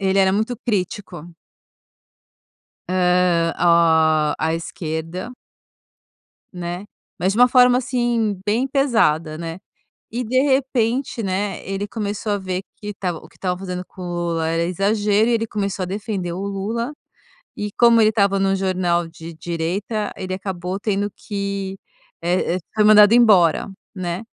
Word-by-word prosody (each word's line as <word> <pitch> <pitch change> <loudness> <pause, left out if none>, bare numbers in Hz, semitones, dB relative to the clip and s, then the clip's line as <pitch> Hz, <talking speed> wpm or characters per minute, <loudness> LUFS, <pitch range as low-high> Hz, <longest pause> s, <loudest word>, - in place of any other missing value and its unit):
ele 195 0 +1
era 190 0 +4
muito 220 +4 -1
crítico. 195 -6 -2 1.7
Hã, 180 -2 +2
o 160 -3 +4
a 160 0 0
esquerda. 165 +5 -5 1.2
Né? 175 +2 -5 0.3
Mas 190 +2 +1
de 220 - -2
uma 245 - +8
forma 250 0 +5
assim, 240 -5 0
bem 225 +6 +1
pesada, 220 - +1
né? 165 +1 -6 0.5
E 240 +3 -2
de 255 +4 +2
repente, 265 -3 0
né, 195 +1 -2
ele 195 +1 -3
começou 210 0 -3
a 205 - 0
ver 185 -1 -3
que 210 0 -7
tava 180 -4 -3
o - - -15
que - - -24
tava 180 -1 -2
fazendo 180 -1 -5
com 190 - -15
o - - -5 0.3
Lula 165 -1 -1
era 165 +1 0
exagero 205 +4 +1
e - - +2
ele 225 0 0
começou 200 -3 -3
a - - -2
defender 195 -2 -3
o 180 - -5
Lula. 220 +6 -3 0.6
E 210 - -3
como 235 -1 +6
ele 215 0 +5
tava 200 -2 +2
no 195 0 +2
jornal 180 -3 0
de 165 0 -10
direita 175 +7 -3
ele 185 0 -4
acabou 185 -1 -4
tendo 205 0 -1
que, 200 -2 -4 0.4
eh 175 0 0
eh - - -2
foi 215 - +2
mandado 210 0 +8
embora, 205 -9 +5 0.3
né. 180 +1 -3
195 Hz, 150 wpm, -21 LUFS, 175-215 Hz, 1.7 s, uma